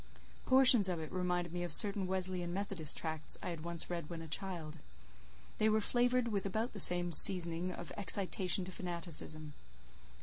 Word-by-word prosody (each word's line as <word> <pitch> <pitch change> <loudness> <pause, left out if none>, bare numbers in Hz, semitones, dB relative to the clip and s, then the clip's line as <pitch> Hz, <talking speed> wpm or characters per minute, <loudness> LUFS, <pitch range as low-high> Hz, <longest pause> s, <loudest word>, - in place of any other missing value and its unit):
Portions 255 -6 +4
of 175 -2 -4
it 155 -1 -9
reminded 180 -2 -4
me 175 - -5
of 175 -2 -5
certain 200 +3 +5
Wesleyan 185 -2 -3
Methodist 185 -5 -3
tracts 160 -2 -2
I - - -5
had 165 -3 -8
once 170 -1 -1
read 170 -4 -7
when 165 -1 -8
a - - -11
child; 165 -3 -7 0.8
they 215 - +1
were 215 0 +1
flavoured 245 +2 0
with 200 -2 -4
about 220 +5 -4
the 205 - -9
same 175 -1 +2
seasoning 175 +1 +5
of 175 -2 -10
excitation 190 -1 +3
to 185 - -9
fanaticism. 165 -4 -5
180 Hz, 170 wpm, -33 LUFS, 170-195 Hz, 0.8 s, certain